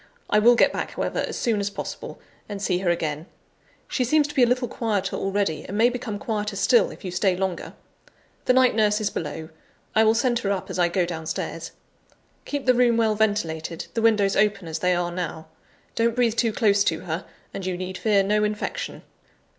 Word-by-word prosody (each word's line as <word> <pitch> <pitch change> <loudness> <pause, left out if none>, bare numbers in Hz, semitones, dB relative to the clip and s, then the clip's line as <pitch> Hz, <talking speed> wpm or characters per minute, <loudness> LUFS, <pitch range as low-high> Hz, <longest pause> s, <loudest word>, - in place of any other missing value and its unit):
I 210 - +5
will 240 +3 +6
get - - +4
back, - - -4
however, - - -2
as - - -3
soon 225 -3 0
as 200 0 -1
possible, 200 - -7 0.3
and 205 -1 -5
see 185 -3 0
her 185 -2 0
again; 160 -1 -2 0.6
she 255 - 0
seems 295 +4 +3
to - - -7
be 265 - +2
a 245 - +6
little 250 +1 +1
quieter 210 -4 -2
already, 195 -4 -1
and 200 - -5
may 235 +3 +5
become 240 -4 -4
quieter 210 -1 -3
still, 240 +4 +4
if - - -11
you 180 - -3
stay 180 +1 +1
longer. 185 -2 -3 0.7
The 255 - +4
night 260 0 +5
nurse 210 -1 +2
is 215 -1 -1
below 160 +1 -5 0.5
I 220 - +6
will 220 0 +4
send 240 0 +1
her 205 - -2
up 195 -2 -3
as - - -4
I 175 - +4
go 175 +1 +1
downstairs. 160 -2 -4 0.8
Keep 285 -1 -4
the 255 - +5
room 240 -1 +3
well 225 -2 +3
ventilated, 170 -7 -1
the 230 - -1
windows 210 -3 +3
open 200 -3 +1
as 160 - -4
they 180 0 +2
are 175 0 -1
now. 170 -2 -4 0.5
Don't 230 0 +1
breathe 240 -3 +2
too 230 -1 +2
close 205 -2 +3
to 160 +1 0
her, 175 0 -4 0.3
and 195 - -5
you 180 -1 -2
need 185 +1 -5
fear 200 +1 +3
no 210 +2 +1
infection. 210 - -3
205 Hz, 210 wpm, -24 LUFS, 180-230 Hz, 0.8 s, will